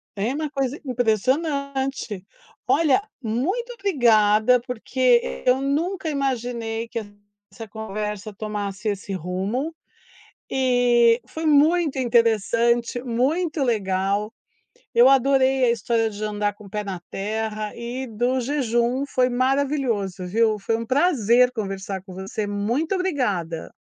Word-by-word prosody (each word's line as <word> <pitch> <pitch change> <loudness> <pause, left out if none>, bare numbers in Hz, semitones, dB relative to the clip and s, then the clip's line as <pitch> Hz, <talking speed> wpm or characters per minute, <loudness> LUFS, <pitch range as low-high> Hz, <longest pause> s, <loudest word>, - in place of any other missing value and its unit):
é 210 +6 -1
uma 305 0 -3
coisa 275 -1 -2
impressionante. 265 - -1 0.4
Olha, 325 +2 +3 0.2
muito 365 - -1
obrigada, 240 - +4
porque 250 0 +1
eu 255 +1 +3
nunca 320 +5 -1
imaginei 240 -5 -2
que 230 - -3 0.5
essa 225 -1 -8
conversa 210 -1 -5
tomasse 210 0 -4
esse 200 -1 -4
rumo 195 - -3 0.8
e 245 -2 +3
foi 320 0 -5
muito 305 -1 +3
interessante, 235 0 +2
muito 290 +7 0
legal, 205 -2 0 0.6
eu 245 +3 +7
adorei 270 0 +4
a 235 - +3
história 225 0 0
de 210 0 -7
andar 210 -1 -1
com 210 +1 -15
o 195 - -12
pé 210 +1 -3
na 190 -3 -5
terra 215 +1 -3
e 245 +2 -5
do 245 +4 0
jejum, 250 -1 0
foi 255 -2 +1
maravilhoso, 255 -7 0
viu, 220 +2 +2
foi 225 +3 -1
um 230 - -5
prazer 250 - +3
conversar 195 -4 -4
com 190 -1 -11
você, 195 +3 -4
muito 235 - -1
obrigada. 205 - -2
235 Hz, 120 wpm, -23 LUFS, 210-270 Hz, 0.8 s, eu